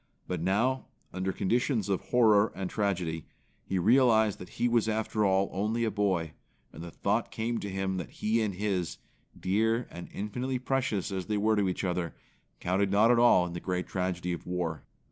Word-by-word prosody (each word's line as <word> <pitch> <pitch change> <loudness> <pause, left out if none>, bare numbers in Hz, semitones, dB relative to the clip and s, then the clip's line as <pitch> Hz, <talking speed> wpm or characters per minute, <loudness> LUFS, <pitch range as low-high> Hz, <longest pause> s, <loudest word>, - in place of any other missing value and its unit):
But 90 -3 -3
now, 115 +9 +1 0.3
under 95 +1 -1
conditions 115 +2 0
of 95 -2 0
horror 110 -4 +4
and 95 -1 -4
tragedy, 90 -7 -1 0.4
he 95 - -2
realized 110 +1 +4
that 90 - -9
he 120 - +2
was 115 -2 +2
after 110 0 0
all 95 0 +3
only 110 +5 0
a 110 - +1
boy; 95 -6 0 0.4
and 80 - -9
the 85 - -7
thought 105 +6 -1
came 115 +1 -2
to 100 - -5
him 95 0 -2
that 90 - -5
he 110 +2 0
and 105 -4 -1
his, 95 -3 -2 0.4
dear 110 +5 +1
and 85 - -8
infinitely 125 +6 -3
precious 125 -6 -1
as 95 -2 -3
they 105 - 0
were 110 +2 +2
to 100 -2 +2
each 90 - -3
other, 90 -2 -2 0.4
counted 95 +3 +1
not 105 +4 +5
at 120 - +4
all 120 -7 +6
in 85 - -6
the 85 - -4
great 90 0 -2
tragedy 90 -1 -2
of 85 - -7
war. 85 -5 -2
100 Hz, 190 wpm, -29 LUFS, 90-110 Hz, 0.4 s, all